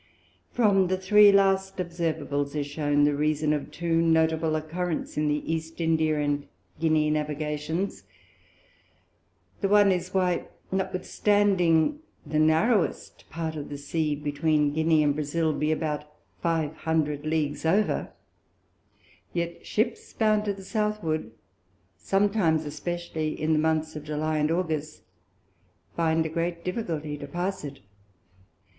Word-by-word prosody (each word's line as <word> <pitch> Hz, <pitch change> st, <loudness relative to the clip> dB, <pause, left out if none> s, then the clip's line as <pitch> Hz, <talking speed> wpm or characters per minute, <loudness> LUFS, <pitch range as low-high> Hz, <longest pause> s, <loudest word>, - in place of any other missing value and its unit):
From 200 Hz, -5 st, +3 dB
the 185 Hz, +1 st, 0 dB
three 205 Hz, +2 st, +6 dB
last 195 Hz, -1 st, +2 dB
Observables 155 Hz, -5 st, -2 dB
is 145 Hz, -1 st, -1 dB
shewn 145 Hz, 0 st, +1 dB
the 145 Hz, 0 st, +3 dB
Reason 150 Hz, +1 st, +1 dB
of 150 Hz, -, -3 dB
two 165 Hz, -1 st, 0 dB
notable 160 Hz, -1 st, +2 dB
Occurents 165 Hz, +2 st, -4 dB
in 150 Hz, 0 st, 0 dB
the 150 Hz, 0 st, -1 dB
East 160 Hz, +1 st, -5 dB
India 160 Hz, -2 st, +1 dB
and 145 Hz, -1 st, -1 dB, 0.3 s
Guinea 155 Hz, -2 st, +2 dB
Navigations: 150 Hz, +4 st, -2 dB, 1.5 s
The 200 Hz, -, +1 dB
one 205 Hz, -1 st, +6 dB
is, 180 Hz, 0 st, -2 dB
why, 180 Hz, -2 st, 0 dB, 0.2 s
notwithstanding 190 Hz, -, +2 dB, 0.3 s
the 155 Hz, +1 st, -1 dB
narrowest 165 Hz, +7 st, +1 dB
part 160 Hz, -1 st, -4 dB
of 145 Hz, -2 st, -6 dB
the 145 Hz, -, -5 dB
Sea 150 Hz, +1 st, -1 dB
between 150 Hz, 0 st, +1 dB
Guinea 160 Hz, 0 st, +3 dB
and 145 Hz, -1 st, +3 dB
Brazile 155 Hz, +2 st, 0 dB
be 150 Hz, +1 st, 0 dB
about 150 Hz, -2 st, -2 dB, 0.4 s
five 165 Hz, -3 st, 0 dB
hundred 150 Hz, -3 st, -1 dB
Leagues 155 Hz, -2 st, -1 dB
over, 195 Hz, +7 st, +1 dB, 1.2 s
yet 170 Hz, 0 st, -3 dB
Ships 225 Hz, +2 st, -2 dB
bound 215 Hz, -1 st, +2 dB
to 205 Hz, -, 0 dB
the 195 Hz, -, -11 dB
Southward, 210 Hz, -, -1 dB, 0.7 s
sometimes, 195 Hz, -, +1 dB
especially 155 Hz, +1 st, -4 dB
in 155 Hz, +1 st, +1 dB
the 155 Hz, -, +3 dB
Months 160 Hz, 0 st, 0 dB
of 150 Hz, -, -6 dB
July 155 Hz, +1 st, -1 dB
and 150 Hz, +1 st, +1 dB
August, 160 Hz, -3 st, -2 dB, 0.9 s
find 160 Hz, -1 st, +1 dB
a -, -, -2 dB
great 170 Hz, +1 st, -3 dB
difficulty 160 Hz, -7 st, -3 dB
to 145 Hz, -, -7 dB
pass 180 Hz, +5 st, -3 dB
it. 140 Hz, -2 st, -8 dB
160 Hz, 130 wpm, -26 LUFS, 150-180 Hz, 1.5 s, three